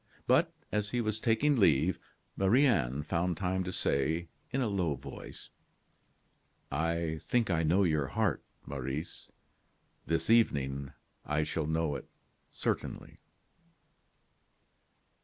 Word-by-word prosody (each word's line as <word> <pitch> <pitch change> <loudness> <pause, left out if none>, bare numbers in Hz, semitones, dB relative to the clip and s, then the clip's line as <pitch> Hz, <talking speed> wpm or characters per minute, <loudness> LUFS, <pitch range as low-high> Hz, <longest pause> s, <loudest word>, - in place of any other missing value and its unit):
But - - +4 0.2
as 105 0 0
he 120 - -1
was 110 -2 -1
taking 130 +6 +2
leave, 80 - +3 0.4
Marie 110 +9 +4
Anne 75 - +1
found 85 +2 -1
time 95 0 0
to 90 - -4
say, 80 +2 0 0.2
in 135 - -1
a 125 - +1
low 90 -8 0
voice: 65 - -10 1.2
"I 80 +2 -1
think 120 -5 +1
I 85 -2 +2
know 85 +5 +3
your 75 -6 +1
heart, - - 0 0.2
Maurice; 70 +3 -5 0.8
this 80 0 0
evening 70 - +2 0.3
I 75 +1 0
shall 75 0 -2
know 80 -1 0
it - - -12 0.4
certainly." - - -3
85 Hz, 120 wpm, -31 LUFS, 75-100 Hz, 1.2 s, But